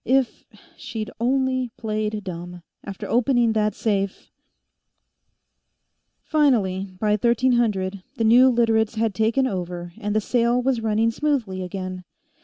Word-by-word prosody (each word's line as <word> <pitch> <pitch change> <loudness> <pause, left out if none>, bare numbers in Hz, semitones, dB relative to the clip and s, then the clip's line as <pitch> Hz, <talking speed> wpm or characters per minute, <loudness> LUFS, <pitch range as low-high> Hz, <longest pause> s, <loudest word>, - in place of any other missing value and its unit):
If 260 -1 0 0.3
she'd 215 -2 -6
only 260 +1 +1
played 215 -1 -3
dumb, 175 -1 -7 0.2
after 195 -2 -7
opening 240 -1 +2
that 215 -1 0
safe 200 -3 -2 1.9
Finally, 200 -11 +1
by 210 +1 +1
1300, 215 -4 +1
the 230 - -1
new 245 +4 +6
Literates 225 -2 +2
had 220 -1 0
taken 225 +6 +1
over, 175 -5 -4
and 210 0 -2
the - - +4
sale 240 +2 +1
was 250 -2 0
running 225 +1 +1
smoothly 230 -9 -1
again. 185 0 -5
220 Hz, 120 wpm, -23 LUFS, 195-240 Hz, 1.9 s, new